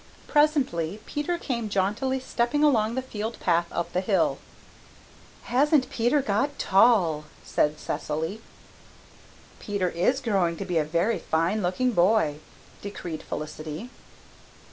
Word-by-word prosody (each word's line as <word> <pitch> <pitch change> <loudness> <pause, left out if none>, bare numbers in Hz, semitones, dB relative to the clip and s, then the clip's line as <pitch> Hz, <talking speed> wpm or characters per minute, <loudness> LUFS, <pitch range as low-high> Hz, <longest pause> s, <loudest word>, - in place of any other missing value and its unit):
Presently 255 - +1
Peter 295 +4 -2
came 235 -9 -3
jauntily 210 +7 0
stepping 260 +3 0
along 230 -6 +3
the 260 - -2
field 220 -2 -5
path 170 -1 +2
up 170 - -3
the 180 - +1
hill. 190 - +1 1.0
"Hasn't 275 +1 +2
Peter 250 +4 +2
got 270 +8 0
tall?" 190 -7 +3 0.2
said 150 0 +1
Cecily. 160 +8 -3 1.2
"Peter 200 -3 -1
is 195 +12 +1
growing 195 -9 0
to 195 - -4
be 175 -3 +1
a - - +2
very 170 +9 0
fine 170 +7 0
looking 185 +8 +1
boy," 175 -6 +2 0.4
decreed 175 -5 -6
Felicity. 155 +8 -6
205 Hz, 120 wpm, -26 LUFS, 170-255 Hz, 1.2 s, along